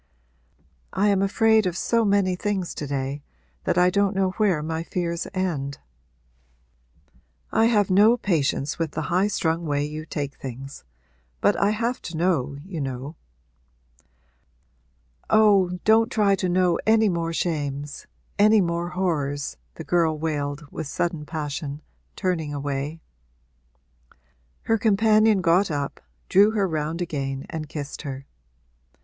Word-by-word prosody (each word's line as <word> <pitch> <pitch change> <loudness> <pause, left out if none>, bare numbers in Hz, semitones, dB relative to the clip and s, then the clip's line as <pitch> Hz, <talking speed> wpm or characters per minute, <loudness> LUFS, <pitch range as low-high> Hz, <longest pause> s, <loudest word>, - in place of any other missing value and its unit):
'I 205 +2 +2
am 195 -1 +2
afraid 220 +1 +3
of 180 0 -3
so 230 +3 +1
many 200 -3 +2
things 190 -2 -2
to 145 - -5
day 135 +1 -3 0.4
that - - +1
I 180 0 +5
don't 200 +1 +1
know 190 -1 +1
where 185 -7 +1
my 160 +1 -2
fears 170 0 -3
end.' 155 -8 -2 1.7
'I 225 - +3
have 210 -5 +3
no 210 +5 +6
patience 150 - 0
with 165 -2 -2
the 155 +1 -3
highstrung 175 -3 +1
way 145 0 0
you 155 +1 -6
take 145 -2 -4
things. 135 +2 -8 0.6
But 205 - +3
I 200 - +2
have 230 +4 -1
to 165 -2 -6
know, 150 -6 0
you 180 -5 -5
know.' 135 +3 -5 2.1
'Oh, 200 -4 +4
don't 220 +1 +4
try 205 -3 +3
to 185 -1 0
know 180 -1 +2
any 220 0 +5
more 170 -3 -1
shames 145 -4 -3 0.3
any 215 +1 +6
more 170 -1 -1
horrors!' 145 -6 -2 0.2
the 160 - -7
girl 165 -2 +1
wailed 150 -1 -3
with 160 - -5
sudden 165 0 -2
passion, 145 -2 -4 0.4
turning 170 -6 -1
away. 145 +2 -3 1.6
Her 225 -1 +1
companion 215 -1 +4
got 180 +3 +3
up, 145 -2 -3 0.3
drew 200 +2 +5
her 200 -3 +1
round 160 +1 -2
again 135 -4 -4
and 155 -2 -5
kissed 145 -2 -6
her. 135 -2 -6
170 Hz, 135 wpm, -24 LUFS, 145-200 Hz, 2.1 s, no